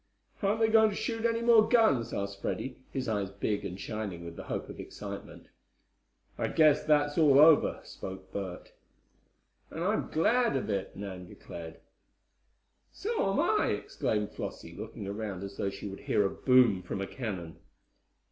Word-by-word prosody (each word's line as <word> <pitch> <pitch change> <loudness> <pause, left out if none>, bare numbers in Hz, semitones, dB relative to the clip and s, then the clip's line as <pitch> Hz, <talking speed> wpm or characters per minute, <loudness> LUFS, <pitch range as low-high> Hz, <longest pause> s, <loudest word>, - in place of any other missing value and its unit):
"Aren't 205 +2 +1
they 225 - +5
going 220 0 +5
to 205 - -5
shoot 225 +1 -2
any 230 0 +1
more 230 -2 +6
guns?" 140 - +4
asked 100 0 -4
Freddie, 130 -1 -3
his 130 -2 -3
eyes 100 -3 -1
big 100 +1 -2
and 95 -1 -5
shining 100 -6 -5
with 85 0 -8
the - - -8
hope - - -4
of - - -10
excitement. - - -8 0.9
"I - - +1
guess 155 -2 +4
that's 145 0 +2
all 145 -4 +6
over," 155 +1 +6
spoke 95 0 -9
Bert. 95 -3 -6 1.0
"And 165 - -5
I'm 210 +4 0
glad 235 - +2
of 125 - -2
it," 100 -1 -3
Nan 95 -2 -7
declared. 80 -1 -10 1.1
"So 425 - -1
am 195 - 0
I," - - +3
exclaimed 105 -1 -1
Flossie, - - -7
looking - - -7
around 100 -2 -4
as 100 0 -8
though 100 - 0
she 100 +1 -7
would 95 0 -7
hear 105 - +1
a 100 - 0
boom 125 -7 +4
from 95 - -5
a 95 - -2
cannon. 95 -9 -5
110 Hz, 165 wpm, -30 LUFS, 100-165 Hz, 1.1 s, more